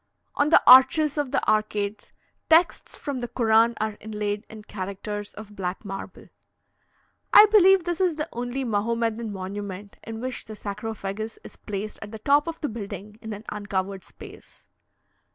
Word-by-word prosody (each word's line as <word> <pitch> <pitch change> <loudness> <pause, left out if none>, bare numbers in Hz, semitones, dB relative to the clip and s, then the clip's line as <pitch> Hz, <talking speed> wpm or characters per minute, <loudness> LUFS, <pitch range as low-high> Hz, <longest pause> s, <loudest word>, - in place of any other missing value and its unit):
On 290 - +1
the - - +6
arches 275 +4 +7
of 290 -3 -1
the - - -1
arcades, 215 -1 -1 0.4
texts 330 +2 +3
from 280 -3 -4
the 240 - -4
Koran 230 0 +3
are 215 -1 -2
inlaid 210 0 -4
in 215 -1 -11
characters 205 +1 -6
of 210 0 -11
black 185 +2 -4
marble. 195 0 -8 1.0
I 425 - +10
believe 385 -3 +6
this 345 +1 -2
is 360 -4 +2
the 305 +1 -3
only 245 +3 -3
Mahomedan 230 0 -1
monument 200 +1 -7
in 225 0 -7
which 255 +2 -4
the 215 - -9
sarcophagus 210 +1 -5
is - - -11
placed 210 +1 -6
at - - -7
the 220 - -7
top 285 +7 +2
of 330 -1 -5
the 300 - -1
building 210 -2 -8
in 220 0 -7
an 210 0 -7
uncovered 200 -2 -3
space. - - -14
215 Hz, 160 wpm, -25 LUFS, 205-255 Hz, 1.0 s, I